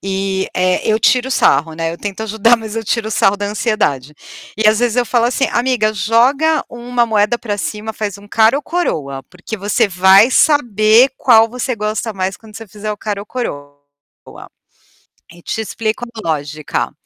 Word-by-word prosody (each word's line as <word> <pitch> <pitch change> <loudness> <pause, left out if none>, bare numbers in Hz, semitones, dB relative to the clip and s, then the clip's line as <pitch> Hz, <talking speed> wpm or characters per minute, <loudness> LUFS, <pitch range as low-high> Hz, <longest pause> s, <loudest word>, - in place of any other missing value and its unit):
e 195 0 -2
eh, 185 0 +1
eu 215 - +3
tiro 250 +3 +2
sarro, 160 - +2
né. 165 0 -2
Eu 170 - -9
tento 205 +1 -5
ajudar 220 +2 +3
mas 220 -1 -8
eu 225 - -3
tiro 220 +1 -1
o - - -7
sarro 205 -2 +2
da 205 0 -3
ansiedade. 200 - -1 0.4
E 215 0 +3
às 215 0 +2
vezes 240 -1 0
eu 245 - +2
falo 240 0 +1
assim: 255 +3 +1
"Amiga 240 -3 +1
joga 260 +10 +2
uma 240 0 -1
moeda 220 +1 +1
pra 205 -4 -4
cima, 215 +2 -4
faz 205 -2 -4
um 205 0 -16
cara 225 +5 +3
ou 290 - -4
coroa, 145 - -3
porque 180 +8 -9
você 205 +1 0
vai 190 +5 +5
saber 240 -4 +4
qual 225 -2 +4
você 250 +2 -3
gosta 215 +1 -3
mais 190 0 -3
quando 215 -2 -17
você 225 - -9
fizer 210 +1 -5
o - - -7
cara 205 -1 -4
ou 205 - -10
coroa." 145 - -6 1.5
E 175 - -16
te 225 - -4
explico 220 +2 -3
a 215 -6 -6
lógica. 150 -1 -3
215 Hz, 185 wpm, -16 LUFS, 195-235 Hz, 1.5 s, vai